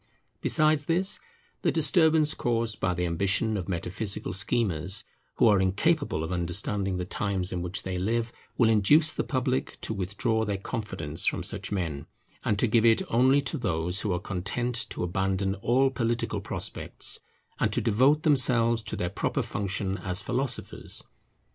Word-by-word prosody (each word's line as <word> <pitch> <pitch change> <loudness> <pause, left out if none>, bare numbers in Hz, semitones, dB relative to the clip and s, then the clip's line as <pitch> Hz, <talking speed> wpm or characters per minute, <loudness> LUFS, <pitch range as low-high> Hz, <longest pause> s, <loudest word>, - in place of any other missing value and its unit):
Besides 155 -1 +3
this, 180 +5 0 0.4
the - - +2
disturbance 160 -1 +3
caused 115 -3 -1
by 90 -1 0
the 90 +1 -1
ambition 95 +6 +1
of 95 -3 -4
metaphysical 95 +2 -3
schemers, 95 -3 0 0.3
who - - +4
are 100 -3 +5
incapable 100 - +1
of 80 - -4
understanding 95 +2 0
the 90 - -3
times 95 -1 -2
in 90 - -3
which 90 +2 -3
they 95 -1 -3
live, 115 +4 -1 0.2
will 120 - +4
induce 115 +9 +4
the - - -1
public 130 -1 -1
to - - -3
withdraw 105 +4 -1
their 100 -2 -1
confidence 95 -8 -3
from - - 0
such - - -3
men, 85 -8 -3 0.4
and 105 - +1
give 115 -1 +4
it 115 -1 +4
only 130 +4 +4
to 140 +2 -2
those 90 -2 +1
who 105 - -1
are 90 - 0
content 105 +6 -2
to - - -4
abandon 95 +2 0
all 125 +7 +2
political 120 -2 -1
prospects, - - -2 0.4
and - - +1
to - - +1
devote 130 +8 +3
themselves 120 -6 +4
to 110 - -5
their 90 - -2
proper 90 - -1
function 100 -1 -3
as 90 0 0
philosophers. 125 0 -2
105 Hz, 160 wpm, -27 LUFS, 95-125 Hz, 0.4 s, are